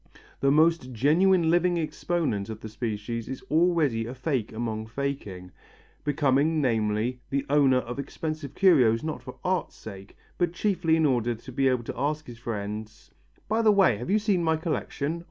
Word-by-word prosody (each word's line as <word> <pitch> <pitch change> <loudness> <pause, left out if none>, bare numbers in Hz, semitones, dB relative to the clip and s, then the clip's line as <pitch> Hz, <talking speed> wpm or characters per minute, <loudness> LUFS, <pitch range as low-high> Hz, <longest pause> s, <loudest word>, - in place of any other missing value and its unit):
The 140 - +2
most 155 -2 +3
genuine 165 - +3
living 175 0 +2
exponent 155 - -2
of 110 -1 -6
the 110 - -7
species 110 +1 -4
is 130 - -6
already 155 -9 +2
a 125 - -6
fake 130 -4 -2
among 110 -1 -4
faking: 110 -8 -5 0.5
becoming, 145 +2 +2
namely, 115 -1 0
the 140 0 -1
owner 140 -3 +4
of 125 +1 -4
expensive 155 0 -5
curios 130 - +4
not 155 -1 -4
for - - -10
art's 185 -2 -1
sake 100 -2 -11 0.2
but 175 -2 +1
chiefly 175 -4 +1
in 160 -1 +2
order 120 -4 +1
to 125 +4 -11
be 135 +2 +1
able 125 -2 +1
to 115 - -6
ask 150 +3 -1
his 120 -2 -11
friends: 105 -1 -6 0.4
"By 220 +2 +1
the 220 -2 +5
way, 195 - +4
have 120 - -6
you 205 - +4
seen 205 -5 +1
my 160 -1 +2
collection?" 160 0 -3
140 Hz, 170 wpm, -26 LUFS, 115-165 Hz, 0.5 s, the